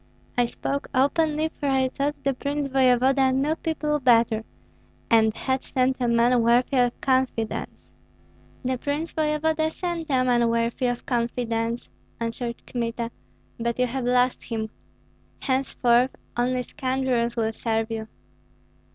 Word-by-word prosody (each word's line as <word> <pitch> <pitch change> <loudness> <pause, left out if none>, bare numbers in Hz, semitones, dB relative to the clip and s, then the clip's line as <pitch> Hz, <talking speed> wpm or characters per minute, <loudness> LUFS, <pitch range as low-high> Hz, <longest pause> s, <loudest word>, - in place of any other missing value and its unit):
I 245 - +3
spoke 280 +4 -3
openly, 305 +3 +2
for 285 - 0
I 265 -1 +3
thought 285 +2 -1
the 275 - +1
prince 285 +2 -2
voevoda 260 0 +4
knew 280 +4 +1
people 300 -2 -1
better, 230 -4 +3 0.7
and 220 -1 +4
had 260 0 -1
sent 255 0 0
a 245 - +1
man 235 +1 +4
worthy 245 +4 +3
of 245 -1 +2
confidence." 260 -4 0 1.0
"The 255 -1 0
prince 295 +5 -3
voevoda 315 +1 +1
sent 335 -1 -4
a 260 -2 +3
man 240 -2 +3
worthy 230 +2 0
of 245 0 -3
confidence," 235 -1 -1 0.3
answered 235 +1 -4
Kmita, 235 -1 -3 0.5
"but 235 0 -1
you 250 - +3
have 250 +1 -3
lost 250 0 +2
him. 220 -2 -3 0.7
Henceforth 260 -1 +2 0.2
only 250 +1 0
scoundrels 255 -2 -1
will 225 -1 0
serve 225 0 -1
you." 220 -1 -4
250 Hz, 135 wpm, -25 LUFS, 235-275 Hz, 1.0 s, voevoda